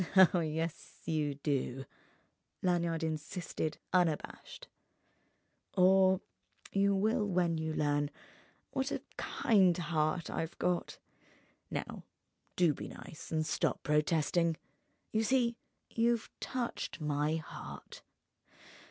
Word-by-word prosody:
"Oh, 180 - +3
yes 160 +1 -3
you 150 -3 0
do!" 135 -2 -1 0.8
Lanyard 170 -3 +1
insisted, 155 0 -3 0.2
unabashed—"or 185 +2 0 0.5
you 200 0 +3
will 215 +2 +2
when 175 -4 +1
you 160 0 -2
learn 145 -1 +1 0.6
what 265 0 0
a - - -3
kind 190 -6 +3
heart 160 0 0
I've 165 - -3
got. 180 -1 0 0.7
Now - - -4 0.5
do 175 -4 +4
be - - -7
nice 155 - -10
and 155 -1 +1
stop - - 0
protesting! 160 +2 +2 0.5
You 220 +1 +2
see, 240 0 +2 0.3
you've 235 0 +1
touched 245 -8 -3
my 150 0 +1
heart. 160 -1 -8
165 Hz, 100 wpm, -33 LUFS, 155-190 Hz, 0.8 s, do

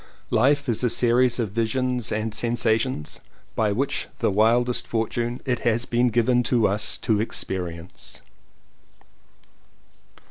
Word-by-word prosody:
Life 140 +1 +3
is 120 0 0
a 125 - +3
series 120 +1 +3
of 115 -5 -2
visions 120 +2 -1
and 110 0 -2
sensations 115 - 0 0.4
which 110 +5 0
by - - -26
the - - +1
wildest 120 +4 +2
fortune 120 +2 -2
it 125 -2 0
has 115 +1 0
been 120 +1 +2
given 120 +1 +2 0.2
us 105 +2 0
to 105 -2 +2
experience. 90 -5 -5
115 Hz, 115 wpm, -24 LUFS, 110-125 Hz, 0.4 s, Life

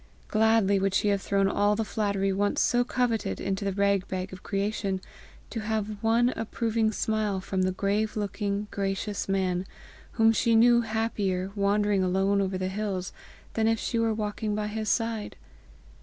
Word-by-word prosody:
Gladly 220 -2 +3
would 195 0 0
she 205 - +2
have 200 -1 +1
thrown 195 0 +1
all 205 +1 +2
the 225 +1 -1
flattery 200 -3 0
once 205 +1 0
so 245 0 +3
coveted 245 -3 -1
into 195 +1 -2
the 200 - 0
rag 200 0 +1
bag 185 0 -4
of 185 - -9
creation, 200 -1 -2 0.5
to 225 - -3
have 215 -1 -3
one 230 +2 +3
approving 225 -2 -1
smile 215 -2 -1
from 190 0 -2
the 185 0 +2
grave 205 +3 -1
looking, 205 0 -2
gracious 200 +1 -2
man, 190 -1 0 0.5
whom 225 -1 +5
she 225 +1 +2
knew 235 +1 +6
happier, 210 -4 -1
wandering 205 0 +2
alone 195 +2 +2
over 190 -1 -1
the 185 0 -2
hills, 190 -2 -3 0.4
than 220 -1 +1
if 225 0 +3
she 230 +1 -2
were 225 -1 +2
walking 210 0 -2
by 210 0 -1
his 215 0 -3
side. 225 -2 -1
205 Hz, 170 wpm, -27 LUFS, 195-220 Hz, 0.5 s, knew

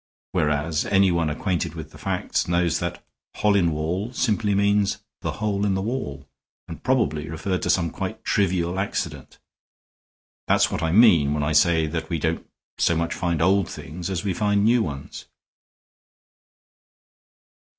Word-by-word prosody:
Whereas 75 +1 0
anyone 90 -5 +3
acquainted 90 +3 -2
with - - -8
the - - -14
facts - - -1
knows 85 -1 +1
that - - -4 0.3
'Hollinwall' 90 0 +1
simply 105 -3 +1
means 100 0 +2 0.2
'the - - -2
hole 105 -2 -1
in 100 -2 +1
the 95 - -1
wall,' 70 - -4 0.4
and 80 - -8
probably 80 - 0
referred 90 +4 -2
to - - -2
some 85 -3 +2
quite 110 +4 -5
trivial 90 -3 +1
accident. 100 - -4 1.1
That's - - +3
what - - -2
I 80 - 0
mean 85 -9 +5
when 75 - -1
I 75 - 0
say 80 +1 +4
that 80 +1 -4
we 85 - -1
don't 80 +2 -2 0.3
so 85 - +3
much 85 0 -1
find 85 -3 -1
old 95 +1 +3
things 85 +6 -7
as 95 -1 -2
we 100 -3 0
find 105 +1 +1
new 120 +1 +4
ones." 70 -8 -6
90 Hz, 150 wpm, -24 LUFS, 80-100 Hz, 1.1 s, mean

